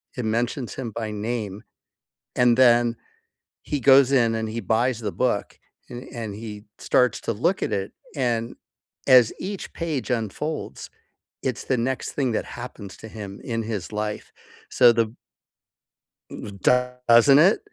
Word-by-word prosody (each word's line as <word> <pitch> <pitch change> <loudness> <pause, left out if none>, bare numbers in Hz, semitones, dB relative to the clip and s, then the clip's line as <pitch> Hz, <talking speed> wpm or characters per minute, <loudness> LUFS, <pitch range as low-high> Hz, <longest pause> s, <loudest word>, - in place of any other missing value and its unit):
It 125 - -3
mentions 120 +3 -2
him 120 -4 -5
by 110 0 -4
name, 105 -2 -4 0.7
and 125 -1 +4
then 120 -2 +5 0.7
he 145 -2 -3
goes 135 +1 +6
in, 115 -4 +3
and 110 -1 -2
he 115 +2 -4
buys 120 +2 0
the 105 -2 -3
book, 120 -5 -1 0.3
a - - -8 0.2
and 110 -4 -5
he 105 -1 -8
starts 125 -2 +2
to - - -1
look 170 - 0
at - - -1
it, 95 0 -2 0.2
and 120 -3 -1 0.5
as 125 -3 +7
each 195 0 -5
page 155 -6 -3
unfolds, 125 +7 -3 0.5
it's 130 -3 -3
the 130 - 0
next 130 +3 -2
thing 130 -5 0
that - - -1
happens 115 -6 -9
to 110 - -10
him 100 -2 -8
in 115 -1 -2
his 105 -4 -5
life. 105 0 -4 0.4
So 120 -1 +6
the 115 0 0 1.5
Doesn't 125 +1 +4
it? 190 +7 +5
120 Hz, 145 wpm, -24 LUFS, 110-125 Hz, 1.5 s, as